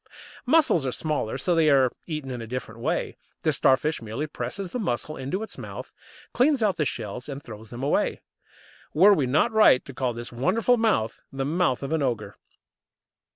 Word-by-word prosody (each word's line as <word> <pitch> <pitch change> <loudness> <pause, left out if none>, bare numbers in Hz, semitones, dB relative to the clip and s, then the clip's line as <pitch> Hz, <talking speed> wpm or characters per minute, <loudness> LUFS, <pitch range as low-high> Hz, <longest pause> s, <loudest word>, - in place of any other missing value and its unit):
Mussels 310 - +4
are 130 - -1
smaller, 145 -5 -2
so 175 +7 +1
they 165 -2 +4
are 135 -3 +4 0.2
eaten 150 -5 -4
in 125 -2 -5
a 115 - -7
different 115 -2 -6
way. - - -2 0.3
The - - +2
Starfish 140 +3 +2
merely 115 +7 -4
presses 155 +7 -5
the 250 - -3
mussel 155 - -2
into 140 +11 -3
its 220 - -8
mouth, - - -8 0.4
cleans 265 -1 +3
out 195 -5 +1
the 150 - +1
shells, 125 +1 -4
and 140 0 -6
throws 110 -2 -10
them 120 +2 -7
away. 140 - 0 0.7
Were 195 +6 +7
we 145 -9 +1
not 155 - +2
right 215 -12 +5
to 135 - -9
call 125 -1 -1
this 120 +1 -7
wonderful 190 - +2
mouth 215 - 0
the 135 0 -3
mouth 150 -4 0
of 140 +3 -3
an 160 - +1
ogre? 110 -6 -2
140 Hz, 190 wpm, -25 LUFS, 125-175 Hz, 0.7 s, Were